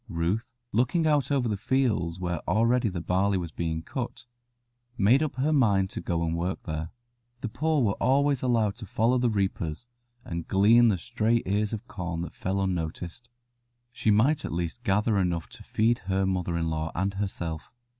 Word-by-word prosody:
Ruth, 90 Hz, +7 st, -1 dB, 0.2 s
looking 130 Hz, -, +2 dB
out 145 Hz, -4 st, +2 dB
over 135 Hz, -4 st, +2 dB
the 105 Hz, -, 0 dB
fields 105 Hz, -7 st, 0 dB
where 85 Hz, -3 st, -2 dB
already 115 Hz, +1 st, +3 dB
the 90 Hz, -3 st, -4 dB
barley 95 Hz, +3 st, +1 dB
was 85 Hz, -3 st, -4 dB
being 80 Hz, -1 st, -3 dB
cut, 120 Hz, +5 st, -5 dB, 0.7 s
made 115 Hz, +8 st, +4 dB
up 150 Hz, -5 st, -1 dB
her 140 Hz, +4 st, +1 dB
mind 100 Hz, -9 st, +3 dB
to -, -, -5 dB
go 85 Hz, -2 st, -1 dB
and 80 Hz, 0 st, -1 dB
work 90 Hz, +3 st, -2 dB
there. 80 Hz, -1 st, -4 dB, 0.5 s
The 120 Hz, -, -3 dB
poor 150 Hz, +4 st, +1 dB
were 100 Hz, -3 st, 0 dB
always 140 Hz, 0 st, +3 dB
allowed 115 Hz, -5 st, +1 dB
to 110 Hz, -4 st, -9 dB
follow 115 Hz, +6 st, +2 dB
the 120 Hz, -1 st, +2 dB
reapers 95 Hz, -2 st, -2 dB, 0.4 s
and 85 Hz, -1 st, -5 dB
glean 110 Hz, +5 st, +5 dB
the 105 Hz, -4 st, +3 dB
stray 115 Hz, +3 st, 0 dB
ears 105 Hz, +2 st, 0 dB
of 110 Hz, -2 st, -5 dB
corn 90 Hz, -3 st, -4 dB
that 85 Hz, -, -6 dB
fell 95 Hz, +1 st, -2 dB
unnoticed. 90 Hz, +4 st, -3 dB, 0.6 s
She 115 Hz, -, -1 dB
might 120 Hz, +9 st, +3 dB
at -, -, -4 dB
least 85 Hz, +6 st, -3 dB
gather 105 Hz, -1 st, +2 dB
enough 85 Hz, -3 st, -1 dB
to -, -, -13 dB
feed 115 Hz, +2 st, +1 dB
her 95 Hz, +1 st, 0 dB
mother 90 Hz, -2 st, -1 dB
in 80 Hz, -1 st, -1 dB
law 80 Hz, 0 st, -2 dB
and 95 Hz, +3 st, 0 dB
herself. 85 Hz, -5 st, -4 dB
100 Hz, 185 wpm, -27 LUFS, 85-120 Hz, 0.7 s, glean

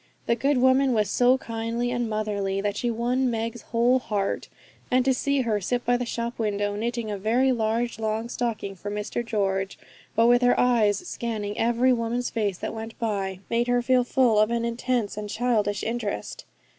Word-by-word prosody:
The -, -, +2 dB
good 275 Hz, +3 st, +1 dB
woman 260 Hz, +1 st, +4 dB
was 210 Hz, -2 st, +1 dB
so 250 Hz, +1 st, +4 dB
kindly 230 Hz, 0 st, -3 dB
and 240 Hz, -2 st, -1 dB
motherly 205 Hz, -2 st, -1 dB
that 205 Hz, 0 st, -1 dB
she 240 Hz, +3 st, -1 dB
won 245 Hz, +3 st, 0 dB
Meg's 230 Hz, 0 st, -3 dB
whole 240 Hz, +4 st, +2 dB
heart; 205 Hz, -5 st, -2 dB, 0.4 s
and 255 Hz, 0 st, +3 dB
to 265 Hz, -, +4 dB
see 280 Hz, +2 st, +1 dB
her 220 Hz, -4 st, 0 dB
sit 245 Hz, +6 st, -1 dB
by 245 Hz, -, +3 dB
the 245 Hz, 0 st, -2 dB
shop 235 Hz, 0 st, -4 dB
window, 205 Hz, -2 st, -1 dB
knitting 230 Hz, 0 st, -2 dB
a 205 Hz, -, -4 dB
very 240 Hz, +6 st, +2 dB
large 230 Hz, -1 st, -1 dB
long 220 Hz, +1 st, -1 dB
stocking 230 Hz, -5 st, -3 dB
for 200 Hz, +2 st, -7 dB
Mr 210 Hz, +3 st, -3 dB
George, 195 Hz, -4 st, -1 dB, 0.4 s
but 225 Hz, +1 st, +4 dB
with 245 Hz, +1 st, +5 dB
her 245 Hz, 0 st, +3 dB
eyes 235 Hz, -, +2 dB
scanning 215 Hz, -, -3 dB
every 240 Hz, +3 st, +3 dB
woman's 235 Hz, +1 st, -1 dB
face 205 Hz, -5 st, -1 dB
that -, -, -4 dB
went 225 Hz, 0 st, -7 dB
by, 195 Hz, -4 st, -2 dB
made 235 Hz, +1 st, 0 dB
her 245 Hz, 0 st, +2 dB
feel 255 Hz, 0 st, +3 dB
full 245 Hz, -3 st, +3 dB
of 215 Hz, +1 st, +4 dB
an 235 Hz, 0 st, 0 dB
intense 235 Hz, -2 st, -1 dB
and 210 Hz, -1 st, -5 dB
childish 215 Hz, -3 st, 0 dB
interest. 230 Hz, -2 st, -4 dB
230 Hz, 190 wpm, -25 LUFS, 210-245 Hz, 0.4 s, with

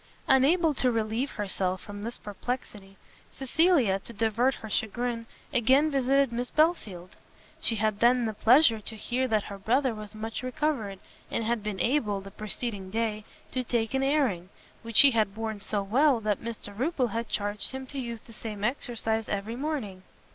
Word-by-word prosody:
Unable 305 Hz, +5 st, +4 dB
to 255 Hz, -2 st, +1 dB
relieve 225 Hz, +4 st, -1 dB
herself 190 Hz, -3 st, -1 dB
from 205 Hz, 0 st, -9 dB
this 235 Hz, +3 st, -5 dB
perplexity, 205 Hz, -2 st, -6 dB, 0.3 s
Cecilia, 270 Hz, -, +2 dB
to 215 Hz, -, -9 dB
divert 230 Hz, +4 st, +1 dB
her 220 Hz, -, -9 dB
chagrin, 230 Hz, +2 st, -2 dB, 0.3 s
again 265 Hz, +5 st, +4 dB
visited 275 Hz, -1 st, +2 dB
Miss 245 Hz, +1 st, -2 dB
Belfield. 215 Hz, -, 0 dB, 0.4 s
She 230 Hz, -, +1 dB
had 215 Hz, -1 st, 0 dB
then 240 Hz, 0 st, +4 dB
the 220 Hz, -, -2 dB
pleasure 230 Hz, +2 st, +5 dB
to 220 Hz, +1 st, -8 dB
hear 250 Hz, +4 st, -1 dB
that 215 Hz, -3 st, +1 dB
her 200 Hz, -1 st, -8 dB
brother 250 Hz, +5 st, +2 dB
was 215 Hz, 0 st, -9 dB
much 220 Hz, +1 st, -5 dB
recovered, 255 Hz, -6 st, -2 dB, 0.3 s
and 230 Hz, -, -1 dB
had 230 Hz, 0 st, 0 dB
been 205 Hz, -2 st, -4 dB
able, 220 Hz, -3 st, +1 dB
the 195 Hz, 0 st, -10 dB
preceding 210 Hz, -1 st, -4 dB
day, 215 Hz, 0 st, -2 dB, 0.3 s
to 255 Hz, -, -1 dB
take 230 Hz, -1 st, -1 dB
an 265 Hz, -, +1 dB
airing, 265 Hz, -, +1 dB, 0.3 s
which 230 Hz, -2 st, +5 dB
he 280 Hz, -, +8 dB
had 215 Hz, -4 st, +1 dB
borne 220 Hz, -1 st, -4 dB
so 200 Hz, 0 st, -2 dB
well 255 Hz, +5 st, +3 dB
that 210 Hz, -2 st, -1 dB
Mr 225 Hz, -3 st, -7 dB
Rupil 260 Hz, +1 st, 0 dB
had 230 Hz, +1 st, -3 dB
charged 205 Hz, 0 st, -1 dB
him 265 Hz, 0 st, -6 dB
to 275 Hz, +1 st, -6 dB
use 235 Hz, -3 st, -5 dB
the 230 Hz, -, -15 dB
same 210 Hz, -2 st, -7 dB
exercise 225 Hz, -2 st, -1 dB
every 205 Hz, +3 st, -3 dB
morning. 255 Hz, -9 st, -3 dB
230 Hz, 175 wpm, -28 LUFS, 210-260 Hz, 0.4 s, he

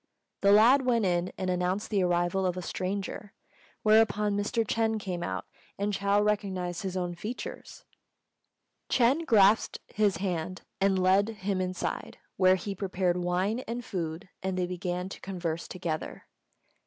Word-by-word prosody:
The 200 Hz, -, +5 dB
lad 235 Hz, +7 st, +6 dB
went 235 Hz, -4 st, +2 dB
in 175 Hz, 0 st, 0 dB
and 185 Hz, -1 st, -1 dB
announced 180 Hz, +4 st, -1 dB
the 200 Hz, -2 st, +2 dB
arrival 175 Hz, +1 st, +1 dB
of 180 Hz, -1 st, 0 dB
a 180 Hz, -, -4 dB
stranger, 195 Hz, +2 st, -4 dB, 0.5 s
whereupon 210 Hz, -1 st, +4 dB
Mr. 215 Hz, +3 st, 0 dB
Ch'êng 225 Hz, 0 st, 0 dB
came 185 Hz, -4 st, -4 dB
out, -, -, -3 dB, 0.3 s
and 205 Hz, +1 st, -1 dB
Chou 200 Hz, +1 st, +2 dB
recognised 190 Hz, -4 st, -1 dB
his 190 Hz, -1 st, -3 dB
own 175 Hz, -1 st, -2 dB
features. 215 Hz, +8 st, -7 dB, 1.0 s
Ch'êng 270 Hz, +7 st, +3 dB
grasped 210 Hz, 0 st, +4 dB, 0.2 s
his 205 Hz, -4 st, +2 dB
hand 185 Hz, -1 st, -3 dB, 0.2 s
and 195 Hz, 0 st, +3 dB
led 190 Hz, +3 st, +3 dB
him 200 Hz, -3 st, -2 dB
inside, 185 Hz, 0 st, -3 dB, 0.2 s
where 185 Hz, 0 st, +5 dB
he 195 Hz, +2 st, -4 dB
prepared 185 Hz, -2 st, -1 dB
wine 180 Hz, +5 st, 0 dB
and 235 Hz, +1 st, -4 dB
food, 165 Hz, -4 st, -4 dB
and 190 Hz, -1 st, -2 dB
they 180 Hz, -, +1 dB
began 180 Hz, 0 st, -3 dB
to 195 Hz, -, -9 dB
converse 170 Hz, -4 st, -4 dB
together. 170 Hz, -4 st, -4 dB
190 Hz, 150 wpm, -29 LUFS, 180-210 Hz, 1.0 s, lad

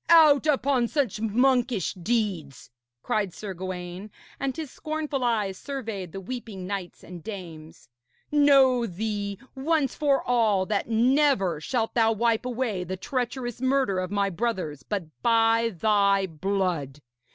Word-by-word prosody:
'Out 310 Hz, -3 st, +7 dB
upon 270 Hz, -4 st, +2 dB
such 245 Hz, -7 st, -1 dB
monkish 245 Hz, -2 st, +2 dB
deeds!' 185 Hz, -, -2 dB, 0.3 s
cried 200 Hz, -5 st, -1 dB
Sir 205 Hz, -3 st, -6 dB
Gawaine, 185 Hz, +2 st, -6 dB, 0.3 s
and 275 Hz, +1 st, -2 dB
his 315 Hz, -4 st, -5 dB
scornful 305 Hz, -3 st, -3 dB
eyes 210 Hz, -6 st, 0 dB
surveyed 225 Hz, -, -5 dB
the 195 Hz, -, -6 dB
weeping 210 Hz, -3 st, -6 dB
knights 190 Hz, -2 st, -5 dB
and 175 Hz, -1 st, -10 dB
dames. 165 Hz, -6 st, -9 dB, 0.4 s
'Know 270 Hz, -5 st, +5 dB
thee, 205 Hz, +1 st, -3 dB, 0.2 s
once 280 Hz, 0 st, 0 dB
for 285 Hz, -2 st, +1 dB
all, 220 Hz, -6 st, +2 dB
that 205 Hz, +2 st, -1 dB
never 235 Hz, -, +2 dB
shalt 225 Hz, +4 st, -1 dB
thou 225 Hz, -1 st, +3 dB
wipe 230 Hz, +2 st, +1 dB
away 235 Hz, -7 st, -2 dB
the 185 Hz, +1 st, -5 dB
treacherous 245 Hz, +1 st, -3 dB
murder 260 Hz, -7 st, +1 dB
of 185 Hz, 0 st, -3 dB
my 200 Hz, 0 st, 0 dB
brothers 180 Hz, -, -2 dB
but 200 Hz, +6 st, -3 dB, 0.2 s
by 230 Hz, -1 st, +3 dB
thy 200 Hz, 0 st, +3 dB
blood. 170 Hz, -5 st, -2 dB
220 Hz, 135 wpm, -26 LUFS, 190-255 Hz, 0.4 s, Out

